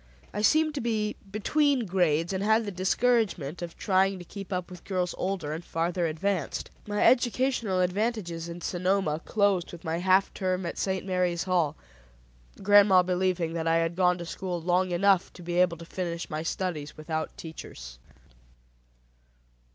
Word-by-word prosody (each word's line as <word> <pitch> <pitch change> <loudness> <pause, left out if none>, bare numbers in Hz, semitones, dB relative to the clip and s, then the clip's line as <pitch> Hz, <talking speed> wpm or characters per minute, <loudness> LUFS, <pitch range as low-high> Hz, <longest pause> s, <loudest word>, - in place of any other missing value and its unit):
I 210 - -2
seemed 310 +7 +3
to 290 - -3
be 215 -2 -1
between 265 +5 +1
grades, 175 -2 +1
and 190 +1 -1
had 220 +2 +3
the 205 - -3
discouragement 190 - +1
of 170 -1 -6
trying 195 0 +2
to 175 - -10
keep 195 +1 -9
up 180 0 -3
with 180 -1 -10
girls 180 -2 -1
older 185 -6 -2
and 165 +2 -5
farther 170 +1 -1
advanced. 165 +1 -2 0.2
My 205 0 0
educational 245 -5 +2
advantages 180 -3 -1
in 170 +1 -7
Sonoma 180 -3 0
closed 200 -4 +1
with 175 - -11
my 165 +1 -2
half 190 +2 +3
term 185 -1 -1
at 170 - -4
St. 190 -1 -1
Mary's 180 -2 0
Hall, 180 -5 +1 0.9
grandma 200 -2 +6
believing 180 -2 0
that 165 -1 -2
I 165 - +3
had 165 0 0
gone 180 -1 +3
to 175 - -6
school 180 0 -4
long 180 +2 +1
enough 190 +1 +3
to 175 - -12
be 175 +1 -1
able 180 -2 +3
to 170 - -10
finish 170 -1 -4
my 155 0 -2
studies 165 -3 -3
without 155 +1 -4
teachers. - - -9
180 Hz, 165 wpm, -28 LUFS, 170-200 Hz, 0.9 s, grandma